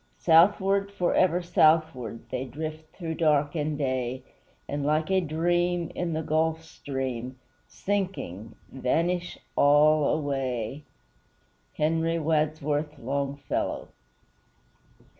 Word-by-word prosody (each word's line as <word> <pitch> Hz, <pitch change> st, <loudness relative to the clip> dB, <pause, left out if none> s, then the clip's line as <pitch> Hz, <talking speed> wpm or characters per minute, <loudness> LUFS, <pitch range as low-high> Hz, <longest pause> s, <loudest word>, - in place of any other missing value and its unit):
Southward, 195 Hz, +4 st, +4 dB
forever 180 Hz, -2 st, +2 dB
southward, 155 Hz, -9 st, +2 dB
They 130 Hz, +1 st, -2 dB
drift 155 Hz, +4 st, -7 dB
through 165 Hz, -3 st, -4 dB
dark 150 Hz, -2 st, +2 dB
and 150 Hz, -1 st, -2 dB
day; 130 Hz, -2 st, -2 dB, 0.4 s
And 145 Hz, 0 st, -3 dB
like 155 Hz, +4 st, +1 dB
a 190 Hz, 0 st, +3 dB
dream, 175 Hz, +1 st, 0 dB
in 175 Hz, -2 st, -2 dB
the 160 Hz, +1 st, -2 dB
Gulf 160 Hz, +1 st, 0 dB
Stream 130 Hz, -5 st, -5 dB, 0.3 s
Sinking, 185 Hz, -, -3 dB, 0.2 s
vanish 170 Hz, +7 st, -1 dB, 0.2 s
all 150 Hz, +1 st, +5 dB
away. 135 Hz, -2 st, -2 dB, 0.9 s
HENRY 165 Hz, +2 st, +1 dB
WADSWORTH 155 Hz, -1 st, 0 dB
LONGFELLOW. 140 Hz, +2 st, -3 dB
155 Hz, 95 wpm, -27 LUFS, 140-165 Hz, 0.9 s, all